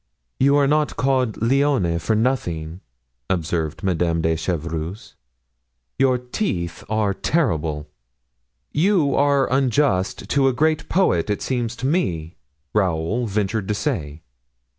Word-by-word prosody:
"You 140 +2 +4
are 145 -1 +4
not 150 +1 +1
called 130 -4 +1
'Lionne' 125 -9 +2
for 110 +6 0
nothing," 90 -8 -1 0.5
observed 85 -2 -2
Madame 85 -3 +1
de 80 0 +2
Chevreuse, 85 +3 -4 0.9
"your 130 -1 +4
teeth 125 - -3
are 110 -2 +1
terrible." 80 - -1 0.8
"You 160 -4 +2
are 140 -1 +3
unjust 130 -7 +1
to 140 -1 +3
a 130 - +2
great 155 +4 +1
poet, 135 - +2
it 105 - -1
seems 120 -3 -2
to 125 - -5
me," 90 - -1 0.4
Raoul 95 +4 0
ventured 105 0 -1
to 105 - 0
say. 80 - -3
110 Hz, 120 wpm, -22 LUFS, 85-135 Hz, 0.9 s, You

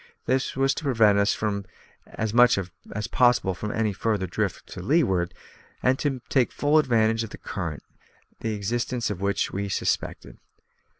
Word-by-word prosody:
This 130 +1 0
was 135 +1 +2
to - - -6
prevent 110 -7 +4
as 105 +1 -3
much 120 -1 +6
as 95 +3 -6
possible 120 -7 +3 0.2
any 110 -2 0
further 105 -1 -1
drift 90 - -3
to - - -7
leeward, 95 - +2 0.5
and 130 +1 +3
to 135 -4 -1
take 130 -3 +2
full 150 +2 +3
advantage 115 -5 +2
of 115 - -6
the - - -9
current, 80 -7 -5 0.6
the 110 -1 -2
existence 120 +3 -2
of 95 -2 -5
which 100 0 0
we 100 +1 -3
suspected. - - -2
110 Hz, 145 wpm, -25 LUFS, 100-125 Hz, 0.6 s, much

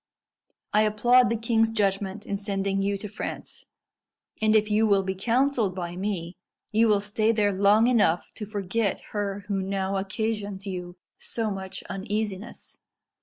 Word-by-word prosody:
I 210 - +5
applaud 240 +4 +4
the 230 - 0
king's 225 0 +2
judgment 200 -1 -1
in 200 - -2
sending 195 -1 -1
you 200 0 0
to 210 - -6
France, 210 +2 -6 0.8
and 215 0 +4
if 215 0 +3
you 220 +1 +4
will 200 -2 +3
be 190 0 -2
counselled 230 0 +1
by 175 -2 -4
me, 185 -2 -3 0.3
you 225 +2 +4
will 210 -2 +3
stay 215 +2 +1
there 210 -2 +2
long 200 +3 +5
enough 215 -9 +2
to 210 - -7
forget 205 0 -1
her 205 -1 -2
who 200 -2 -1
now 195 0 -1
occasions 200 0 -3
you 180 -2 -5 0.2
so 225 -2 -2
much 190 -1 -6
uneasiness." 205 +1 -5
205 Hz, 155 wpm, -26 LUFS, 195-220 Hz, 0.8 s, I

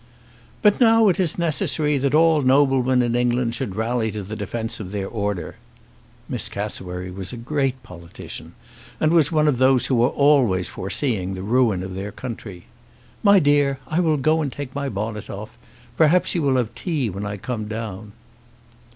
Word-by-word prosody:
"But 210 +3 +4
now 225 -2 +6
it 185 - 0
is 175 -5 +3
necessary 155 -3 +1
that 140 +2 +1
all 160 -1 +4
noblemen 130 -2 +3
in 120 -1 -1
England 120 -1 +1
should 100 -5 -4
rally 110 +1 -1
to 105 -1 -5
the 105 +3 -6
defence 115 +2 -4
of 100 -4 -6
their 100 -2 -3
order." 100 -5 -4 0.7
Miss - - -3
Cassewary 90 0 -5
was 95 0 -6
a 125 - -7
great 135 +1 -2
politician, 85 -2 -10 0.4
and 155 - +2
was 160 -4 +4
one 155 -1 +2
of 135 -5 +1
those 130 -1 +4
who 125 -3 +1
are 125 - +4
always 130 - +3
foreseeing 95 -2 -2
the 95 - -6
ruin 110 -4 +2
of 95 0 -6
their 100 +2 -5
country. 105 -7 -8 0.6
"My 200 -1 +6
dear, 145 -4 +3
I 155 +5 -1
will 160 -4 +2
go 155 +4 +2
and 145 -3 -2
take 140 -2 -7
my 140 -1 -3
bonnet 105 0 -5
off. 105 +4 -8 0.4
Perhaps 165 +3 +3
you 170 - 0
will 140 -3 +2
have 120 -4 -1
tea 155 -9 -2
when 100 +3 -6
I 100 0 -4
come 110 +1 -4
down." 110 -2 -6
125 Hz, 180 wpm, -22 LUFS, 105-145 Hz, 0.7 s, now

